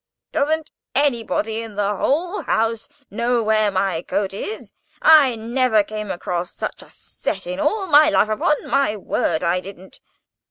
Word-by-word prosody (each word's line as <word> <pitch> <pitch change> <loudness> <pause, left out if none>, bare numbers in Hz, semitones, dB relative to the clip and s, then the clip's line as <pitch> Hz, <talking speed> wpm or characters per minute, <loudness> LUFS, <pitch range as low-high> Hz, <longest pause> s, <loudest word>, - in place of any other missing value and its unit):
[Picture: - - -67
Nails 285 +1 +1
etc.] 315 0 +1
"Doesn't 300 - -23 0.3
anybody 225 -3 -1
in 225 -2 -9
the 205 0 0
whole 345 - 0
house 225 0 -1 0.2
know 235 +2 0
where 215 -1 +2
my 190 -3 -1
coat 195 +2 -2
is? 415 - -6 0.3
I 295 -6 +6
never 230 -1 +1
came 215 0 -6
across 175 0 -3
such - - -5
a - - -16
set 195 - -5
in 180 +1 -5
all 420 - 0
my 305 -2 +6
life—upon 215 +2 +1
my 275 -6 +1
word 170 -5 -1
I 175 +2 +1
didn't. 190 0 -12
220 Hz, 165 wpm, -21 LUFS, 195-275 Hz, 0.3 s, I